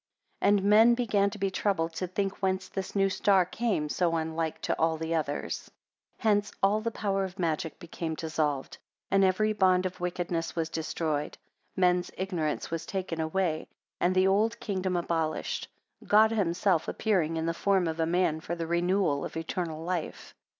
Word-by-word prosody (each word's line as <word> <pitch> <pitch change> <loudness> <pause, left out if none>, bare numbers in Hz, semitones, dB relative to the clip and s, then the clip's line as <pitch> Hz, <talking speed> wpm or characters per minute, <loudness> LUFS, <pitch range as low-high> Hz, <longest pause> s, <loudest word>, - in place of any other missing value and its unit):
12 - - +3
And 195 - -2
men 220 +3 +7
began 205 -5 +2
to 200 - -9
be 195 -1 -1
troubled 180 -4 0
to 185 - -3
think 195 +2 -3
whence 190 -1 0
this 195 0 -5
new 195 -1 +4
star 190 -1 +3
came 195 -5 -1
so 165 +2 +1
unlike 160 0 -2
to - - 0
all 160 0 +2
the 160 +1 -3
others. 150 -3 -2 0.5
13 - - -18
Hence 205 0 +1
all 205 +2 +3
the 230 - -1
power 200 -3 -1
of 190 0 -6
magic 165 -2 -1
became 165 -2 -5
dissolved; 155 -4 -2 0.3
and 195 0 +4
every 215 +3 +2
bond 185 -2 +3
of 185 0 -4
wickedness 175 -1 -2
was 165 -1 -1
destroyed: 155 -2 -2 0.4
men's 180 -1 +2
ignorance 175 -7 -2
was 165 -1 -3
taken 185 -4 -3
away; 160 0 -1 0.3
and 180 +1 +2
the 185 0 +4
old 215 +4 +2
kingdom 185 -3 -2
abolished; 165 -2 -2 0.4
God 215 +1 +6
himself 185 -4 +1
appearing 175 -7 0
in 160 - -1
the 165 - 0
form 190 0 +2
of 160 0 -3
a 160 - +2
man, 170 -2 +1
for 170 +2 -4
the 165 -1 -3
renewal 170 -2 +1
of - - -5
eternal 165 -1 -3
life. 175 -1 -4
180 Hz, 180 wpm, -29 LUFS, 165-195 Hz, 0.5 s, men